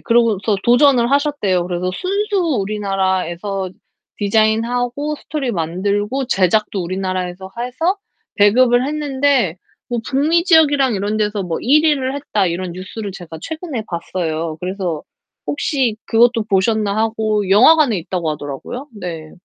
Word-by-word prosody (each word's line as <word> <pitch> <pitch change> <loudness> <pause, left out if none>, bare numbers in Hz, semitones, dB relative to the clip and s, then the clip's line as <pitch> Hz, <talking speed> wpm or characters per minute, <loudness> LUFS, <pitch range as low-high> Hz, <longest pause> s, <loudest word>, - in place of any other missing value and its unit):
그러고서 225 -3 +2
도전을 245 0 +4
하셨대요. 280 - +1
그래서 180 0 -2
순수 405 - -1 0.2
우리나라에서 195 -2 -2 0.5
디자인하고 235 +7 +1
스토리 285 -5 -3
만들고 200 +9 -1
제작도 200 -1 +1
우리나라에서 185 0 -4
해서 320 +11 -1 0.4
배급을 245 +4 +4
했는데 280 - +1 0.3
뭐 240 -1 -2
북미 310 +5 +2
지역이랑 290 - +4
이런 205 +2 -1
데서 210 -1 -1
뭐 170 -2 -3
1 300 +5 +4
위를 275 -4 +1
했다 215 -9 0
이런 175 +1 -3
뉴스를 190 +3 -6
제가 170 -4 -9
최근에 315 - -5
봤어요. 165 -2 -3
그래서 180 -4 -3 0.4
혹시 230 - 0
그것도 230 0 +3
보셨나 205 0 +1
하고 220 -2 0
영화관에 255 +3 +6
있다고 170 -1 -3
하더라고요. 150 - -6
네. 170 -6 -7
215 Hz, 325 characters per minute, -18 LUFS, 185-260 Hz, 0.5 s, 영화관에